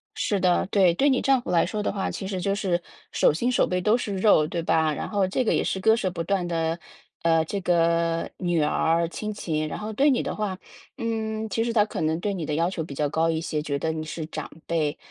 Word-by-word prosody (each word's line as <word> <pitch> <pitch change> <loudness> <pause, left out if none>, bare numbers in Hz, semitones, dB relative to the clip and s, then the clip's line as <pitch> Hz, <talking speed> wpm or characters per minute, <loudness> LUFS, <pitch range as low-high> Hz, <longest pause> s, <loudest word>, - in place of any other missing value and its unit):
是 205 - 0
的， 180 -1 +2
对。 190 -3 +4
对 280 +9 +3
你 255 - +2
丈 270 -2 +3
夫 - - -8
来 170 -2 +4
说 210 +4 -3
的 - - -1
话， 195 -1 -2
其 190 - -5
实 190 -2 -3
就 195 +2 0
是 190 -4 0 0.3
手 - - +3
心 235 +11 0
手 250 - +3
背 180 - -1
都 210 +6 +3
是 205 -5 -3
肉， 190 -6 +5
对 170 0 -3
吧， 160 -1 +2
然 - - -4
后 200 -3 +1
这 200 +7 0
个 225 - +1
也 - - +1
是 190 - -1
割 220 +3 +4
舍 190 -6 -1
不 170 -2 -4
断 195 -1 0
的， 165 -1 -1 0.4
呃， 165 -1 +3
这 200 +4 -3
个 170 -1 +1
女 175 -3 0
儿 165 +2 +2
亲 215 +5 -5
情。 155 -6 -2
然 - - -5
后 215 +1 -5
对 280 +7 +4
你 255 - +2
的 - - -4
话， 205 -3 -2 0.4
嗯， 220 -1 -2
其 225 +4 0
实 235 - -1
他 210 -3 +4
可 - - -5
能 160 +1 0
对 200 +3 -1
你 175 -5 -4
的 150 - -2
要 165 +3 +1
求 170 -3 -3
比 150 - -8
较 145 +2 0
高 160 +3 +1
一 160 -1 0
些， 155 -2 -2
觉 145 -2 -2
得 160 - -1
你 160 0 -4
是 155 0 -5
长 - - -6 0.2
辈， 155 -3 0
180 Hz, 280 characters per minute, -25 LUFS, 165-210 Hz, 0.4 s, 肉